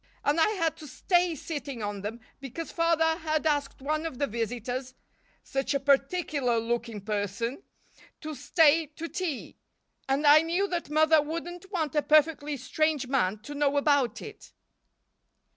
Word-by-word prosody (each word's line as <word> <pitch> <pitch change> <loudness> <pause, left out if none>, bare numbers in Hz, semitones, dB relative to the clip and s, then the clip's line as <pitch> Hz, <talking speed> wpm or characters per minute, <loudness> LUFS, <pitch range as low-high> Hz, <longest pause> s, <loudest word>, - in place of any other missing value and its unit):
And 295 +3 +2
I 320 - +5
had 330 -5 -1
to 305 - -10
stay 350 +5 +1
sitting 280 -6 -5
on 205 -1 -4
them 220 +4 -6 0.2
because 275 +5 -7
Father 330 -1 +2
had 310 -1 -1
asked 290 -3 -1
one 310 +3 -1
of 310 - -8
the 285 - +1
visitors 245 +3 -4 0.5
such 270 +1 -2
a - - +2
particular 275 -2 +1
looking 230 -2 -3
person 210 - -3 0.6
to 310 0 -5
stay 315 +3 +3
to 330 - -5
tea; 335 -7 -4 0.5
and 275 +3 +1
I 295 +1 +8
knew 345 +5 0
that 345 -4 -3
Mother 310 +1 +4
wouldn't 345 +5 -6
want 320 -7 -1
a 300 - +2
perfectly 300 -1 +2
strange 300 +2 0
man 215 -6 0
to 290 - -7
know 285 0 +1
about 285 -5 +2
it." 430 - -11
290 Hz, 155 wpm, -28 LUFS, 255-320 Hz, 0.6 s, I